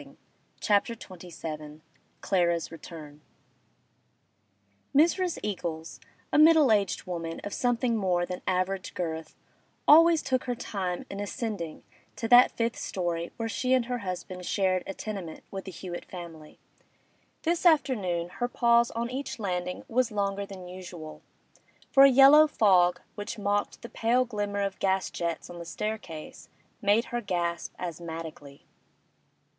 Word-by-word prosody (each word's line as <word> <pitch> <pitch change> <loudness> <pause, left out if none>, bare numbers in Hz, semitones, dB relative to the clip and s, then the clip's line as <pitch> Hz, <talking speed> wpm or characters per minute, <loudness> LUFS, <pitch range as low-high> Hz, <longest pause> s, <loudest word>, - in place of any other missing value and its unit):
CHAPTER 210 +3 +2
XXVII 160 -6 -8 0.4
CLARA'S 170 -3 +1
RETURN 155 -2 -10 1.7
Mrs. 345 +4 +3
Eagles, 170 -5 -4 0.3
a - - +5
middle 310 -4 +7
aged 200 -3 +1
woman 165 -2 -4
of 205 - -5
something 245 -1 +1
more 180 -4 +1
than 180 0 -6
average 185 +1 -1
girth, 160 -2 -4 0.5
always 330 +1 +7
took 260 -1 0
her 245 -1 -1
time 185 -6 -4
in 195 - -6
ascending 205 -5 -4 0.3
to 225 - -3
that 245 +1 +8
fifth 230 0 -2
storey 170 -2 -3
where 230 -1 -2
she 255 +3 +1
and 250 -2 +1
her 245 0 -3
husband 185 -2 -6
shared 185 0 +1
a 195 - -5
tenement 195 -7 -6
with 195 -1 -6
the 190 - -6
Hewett 175 0 -7
family. 165 -4 -10 0.9
This 335 +1 0
afternoon 225 - +2
her 245 - -2
pause 235 -1 +3
on 235 +1 -3
each 265 +1 -4
landing 180 -4 -3
was 250 +1 +1
longer 200 -1 -1
than 185 -2 -9
usual, 175 -4 -9 0.7
for 275 0 +8
a - - +8
yellow 275 +4 +8
fog, 185 -9 +3
which 205 +2 -6
mocked 205 0 -1
the - - -6
pale 240 +3 +1
glimmer 205 -3 -3
of 195 -1 -2
gas 190 -1 0
jets 170 -1 -3
on 175 0 -9
the - - -6
staircase, 175 -4 -6 0.3
made 210 +3 +3
her 240 - 0
gasp 175 -4 -2
asthmatically. 160 -4 -7
195 Hz, 140 wpm, -28 LUFS, 175-235 Hz, 1.7 s, that